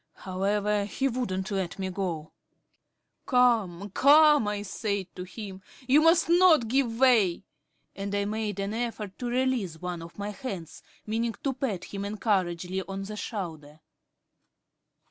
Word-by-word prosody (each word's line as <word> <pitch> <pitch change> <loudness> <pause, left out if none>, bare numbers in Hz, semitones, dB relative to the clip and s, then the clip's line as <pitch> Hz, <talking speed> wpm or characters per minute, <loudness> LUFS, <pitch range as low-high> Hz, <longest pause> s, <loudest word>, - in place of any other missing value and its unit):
However, 200 +2 0
he 265 +6 -1
wouldn't 210 -7 -2
let 190 -3 -2
me 190 -1 -3
go. 175 -5 -4 1.0
"Come, 220 -7 +2
come," 295 0 +6
I 205 0 -2
said 200 -1 -2
to 180 - -6
him, 190 0 -8 0.3
"you 280 +4 +6
must 330 +1 +5
not 340 -7 +5
give 240 -1 +1
way," 220 -10 +4 0.5
and 200 0 -3
I 200 0 0
made 210 -1 -3
an 200 +1 -2
effort 225 -4 -4
to 245 - -3
release 240 -9 0
one 180 -1 -4
of 165 0 -11
my 205 0 -4
hands 200 - -7 0.2
meaning 225 +1 -1
to 275 - 0
pat 245 -8 -3
him 200 0 -6
encouragingly 190 -3 -1
on 195 +1 -6
the 210 +2 -6
shoulder. 160 -9 -6
205 Hz, 145 wpm, -28 LUFS, 190-245 Hz, 1.0 s, come